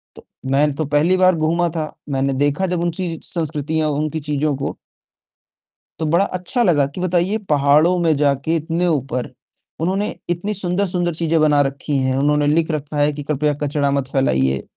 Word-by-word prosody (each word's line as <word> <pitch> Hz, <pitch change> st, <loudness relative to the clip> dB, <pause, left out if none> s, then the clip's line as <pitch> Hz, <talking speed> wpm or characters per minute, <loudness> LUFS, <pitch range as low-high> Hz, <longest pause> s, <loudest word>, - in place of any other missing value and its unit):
तो -, -, -14 dB, 0.3 s
मैं 145 Hz, +2 st, +3 dB
तो 155 Hz, +1 st, -2 dB
पहली 150 Hz, +6 st, +2 dB
बार 185 Hz, -1 st, +4 dB
घूमा 165 Hz, +2 st, +1 dB
था, 155 Hz, -2 st, -4 dB, 0.2 s
मैंने 135 Hz, 0 st, 0 dB
देखा 145 Hz, +7 st, +1 dB
जब 175 Hz, -1 st, -1 dB
उनकी 170 Hz, -1 st, -2 dB
संस्कृतियाँ, 155 Hz, -1 st, -1 dB
उनकी 150 Hz, +2 st, -2 dB
चीज़ों 150 Hz, -1 st, -1 dB
को 140 Hz, -, -4 dB, 1.2 s
तो 160 Hz, -, -1 dB
बड़ा 170 Hz, +6 st, +3 dB
अच्छा 185 Hz, +7 st, -1 dB
लगा 150 Hz, -8 st, +3 dB
कि 180 Hz, -, -4 dB
बताइए 185 Hz, +3 st, +1 dB
पहाड़ों 150 Hz, +5 st, +4 dB
में 165 Hz, -3 st, +2 dB
जाकर 140 Hz, +1 st, +1 dB
इतने 165 Hz, +2 st, 0 dB
ऊपर, 135 Hz, -5 st, -1 dB, 0.5 s
उन्होंने 195 Hz, +5 st, -1 dB
इतनी 175 Hz, +5 st, -1 dB
सुंदर-सुंदर 180 Hz, -2 st, -1 dB
चीजें 165 Hz, -1 st, +1 dB
बना 150 Hz, -2 st, +4 dB
रखी 140 Hz, +1 st, -3 dB
हैं, 130 Hz, 0 st, 0 dB
उन्होंने 145 Hz, +1 st, +2 dB
लिख 160 Hz, +2 st, +2 dB
रखा 150 Hz, 0 st, -4 dB
है 145 Hz, +1 st, +3 dB
कि 145 Hz, 0 st, -6 dB
कृपया 150 Hz, 0 st, 0 dB
कचरा 145 Hz, -1 st, 0 dB
मत 140 Hz, -2 st, -1 dB
फैलाइए। 65 Hz, -, +1 dB
155 Hz, 170 wpm, -19 LUFS, 145-175 Hz, 1.2 s, बार